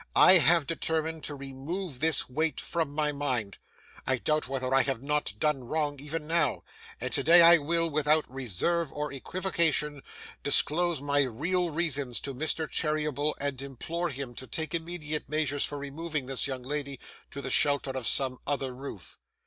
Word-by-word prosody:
I 185 -1 +9
have 165 -1 +4
determined 160 0 -2
to 145 - -3
remove 140 +3 -7
this 160 -1 +3
weight 155 +3 -1
from 165 -4 -2
my 150 0 0
mind. 130 -8 -3 0.5
I 130 - +2
doubt 155 +3 -1
whether 130 -1 -2
I 135 - +6
have 135 -2 -3
not 150 -6 -1
done 150 0 0
wrong, 145 +1 -2
even 150 +2 -5
now; 160 -4 +1 0.4
and - - -3
today 170 +2 +7
I 170 0 +8
will, 165 +3 -1
without 155 0 +2
reserve 135 - -2
or 150 -1 -5
equivocation, 155 -2 +1 0.4
disclose 160 +1 +2
my 145 0 +2
real 165 +8 -1
reasons 145 -6 -1
to 140 - -5
Mr 155 +3 -2
Cherryble, 150 -1 -1
and 140 -2 -3
implore 160 +6 -4
him 135 -2 -6
to 130 - -5
take 160 -1 -4
immediate 160 -3 -1
measures 145 -2 +1
for 145 - -5
removing 145 +1 -4
this 135 0 0
young 130 -2 -5
lady 140 0 -3 0.3
to 140 - -8
the 135 -1 -5
shelter 145 -2 +2
of 130 -3 -4
some 130 -2 +2
other 135 -2 -2
roof. 110 - -9
145 Hz, 165 wpm, -28 LUFS, 135-160 Hz, 0.5 s, I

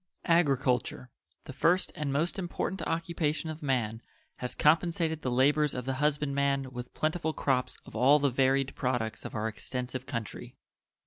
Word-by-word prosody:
Agriculture, 135 -7 +1 0.3
the 140 - -8
first 175 +7 +2
and 150 -2 -2
most 165 +8 0
important 185 +1 -3
occupation 165 -2 -1
of 155 - -9
man, 120 -6 -1 0.4
has 125 - -5
compensated 160 0 +2
the 130 - -1
labors 145 +4 +3
of 125 -1 -4
the 135 - -1
husband 150 -1 +1
man 140 -1 0
with 125 -1 -7
plentiful 160 0 0
crops 125 -4 0
of - - -12
all 130 +6 +6
the 140 -2 +1
varied 135 +1 +2
products 120 -4 -2
of - - -6
our 110 0 -1
extensive 125 +3 -5
country. 115 -5 -5
140 Hz, 155 wpm, -30 LUFS, 125-155 Hz, 0.4 s, all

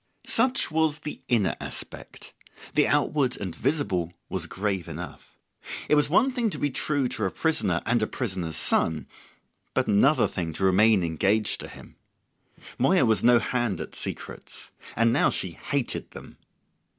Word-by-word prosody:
Such 250 -5 +2
was 160 -1 +2
the 150 - -6
inner 115 -6 +2
aspect; - - -7 0.4
the - - +4
outward 135 -5 +1
and 95 -4 -5
visible 120 - 0 0.2
was - - -3
grave 95 -3 -2
enough. 85 +2 -9 0.5
It - - +2
was 150 -1 +4
one 240 - +4
thing 245 -3 0
to 160 - -4
be 145 0 -1
true 140 0 0
to 110 - -2
a - - +1
prisoner 105 - 0
and 115 0 +2
a 110 - +1
prisoner's 95 - -3
son, 80 -1 +2 0.7
but - - +2
another 120 +9 +4
thing 85 -4 -4
to 95 - -4
remain 95 +1 +5
engaged 100 +6 +1
to - - -7
him. - - -14 0.8
Moya 135 +3 +4
was 110 -2 +2
no 120 0 +7
hand 120 -5 -1
at - - -6
secrets. - - -6 0.2
And 115 0 +3
now 140 - +4
she 95 - -2
hated 135 - -3
them. - - -12
115 Hz, 160 wpm, -26 LUFS, 95-145 Hz, 0.8 s, no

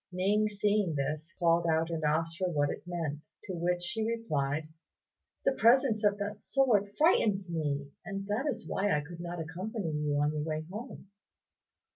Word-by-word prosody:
Ning 205 +4 +2
seeing 205 -4 +1
this, 150 +3 -2
called 170 -1 +3
out 160 +1 +2
and 160 -1 -2
asked 165 +2 0
her 185 -1 +1
what 145 -3 +1
it - - -6
meant; 160 -4 -3 0.2
to 190 - -5
which 175 +1 0
she 220 +5 -1
replied, 155 -10 -1 0.8
"The - - +5
presence 240 -2 +4
of 205 -1 +3
that 205 0 -4
sword 220 -7 +2
frightens 205 - +3
me, 145 -3 -2
and 195 -1 -5
that 215 +8 -1
is 285 - -3
why 200 -5 +1
I - - 0
could 170 +3 -10
not 175 0 -5
accompany 180 +3 -4
you 150 -1 0
on 145 +1 +2
your 150 - -2
way 155 0 -3
home." 215 -2 -8
175 Hz, 175 wpm, -31 LUFS, 155-210 Hz, 0.8 s, The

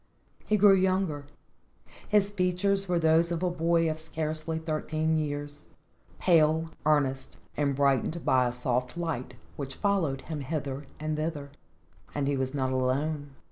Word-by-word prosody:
He 215 - +3
grew 205 0 +7
younger; 185 -6 +1 0.8
his 205 -1 +3
features 195 +1 0
were 175 - +2
those 165 +1 +3
of 170 +1 -2
a 180 - +1
boy 165 -1 +2
of 155 0 -2
scarcely 160 0 -3
thirteen 160 0 -1
years, 145 0 -4 0.5
pale, 160 -2 +3 0.2
earnest 135 -3 +1 0.2
and 140 -2 +1
brightened 140 +4 +1
by 130 -1 +4
a - - -1
soft 125 +2 -2
light 165 -7 -3 0.2
which 135 -2 -5
followed 180 -10 0
him 155 -2 -5
hither 140 -1 -4
and 155 0 -2
thither, 155 -3 -3 0.6
and 145 -2 0
he 145 - +1
was 130 +1 -2
not 130 -2 0
alone. 140 +3 -1
155 Hz, 145 wpm, -28 LUFS, 140-170 Hz, 0.8 s, grew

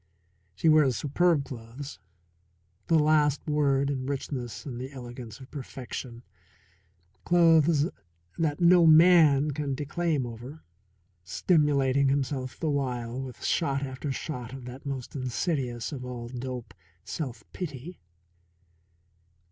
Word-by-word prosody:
She 165 - 0
wears 150 -6 +5
superb 150 0 +2
clothes 125 +3 -8 0.9
the 165 - +4
last 150 -2 +3
word 140 -2 +2
in 130 -2 -3
richness 130 -5 -4
and 125 -4 -5
the 130 +2 -6
elegance 120 -4 -9
of 130 - -13
perfection 125 -3 -7 1.0
clothes 165 -3 +4 0.5
that 150 -3 0
no 175 -1 +6
man 155 -3 +6
can 140 -1 -2
declaim 150 0 -1
over, 120 +6 -9 0.6
stimulating 140 - +2
himself 135 -2 -2
the 160 - -1
while 125 -3 -2
with 130 -2 -8
shot 140 -4 +1
after 135 +1 -4
shot 125 -3 -5
of 135 -2 -8
that 125 +3 -9
most 135 -1 -5
insidious 130 -2 -2
of 135 -4 -6
all 120 -2 -6
dope, 125 -1 -6 0.3
self 125 -5 -5
pity. 165 0 -6
140 Hz, 115 wpm, -28 LUFS, 125-150 Hz, 1.0 s, no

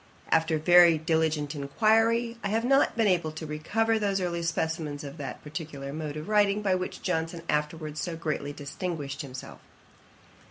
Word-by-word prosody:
After 160 0 +3
very 175 +1 +7
diligent 160 -2 0
inquiry, 225 +10 +2
I - - 0
have 220 +3 0
not 270 -1 +3
been 225 - +3
able 175 -5 +2
to 160 0 -6
recover 220 +9 0
those 200 -2 0
early 175 -2 -2
specimens 160 -3 -2
of 140 +2 -8
that 140 -2 -7
particular 150 -3 -6
mode 155 -1 -4
of 155 - -6
writing 210 -1 +3
by 195 -2 +2
which 185 0 -3
Johnson 165 -1 -2
afterwards 150 0 -2
so 170 -2 -3
greatly 155 -3 -3
distinguished 145 0 -5
himself. 130 -3 -9
160 Hz, 160 wpm, -28 LUFS, 150-195 Hz, -, very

